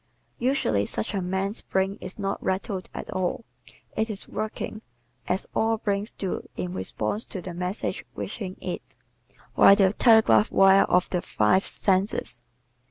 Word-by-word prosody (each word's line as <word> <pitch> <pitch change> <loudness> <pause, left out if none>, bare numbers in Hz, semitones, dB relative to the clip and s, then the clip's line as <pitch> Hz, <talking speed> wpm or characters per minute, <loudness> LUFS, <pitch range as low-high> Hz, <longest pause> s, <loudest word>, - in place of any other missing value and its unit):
Usually 110 - +1
such 110 - -2
a 195 - -1
man's 190 +3 -2
brain 190 +1 -1
is - - -6
not 195 -1 -2
rattled 190 0 -2
at - - -7
all; 185 +4 -2 0.5
it 220 +1 0
is 205 -2 -6
working, 215 0 -4 0.5
as 185 +2 -1
all 225 0 +2
brains 205 0 -1
do 190 - -4 0.2
in 90 -1 -3
response 105 - -2
to 190 - -6
the 180 0 -7
messages 180 +4 -3
reaching 190 -4 -5
it, - - -6 0.6
via 200 - +8
the 195 -1 +3
telegraph 220 - +5
wires 195 0 +6
of 180 0 +3
the 180 - 0
five 110 - +2
senses. 185 - 0
190 Hz, 150 wpm, -26 LUFS, 180-210 Hz, 0.6 s, via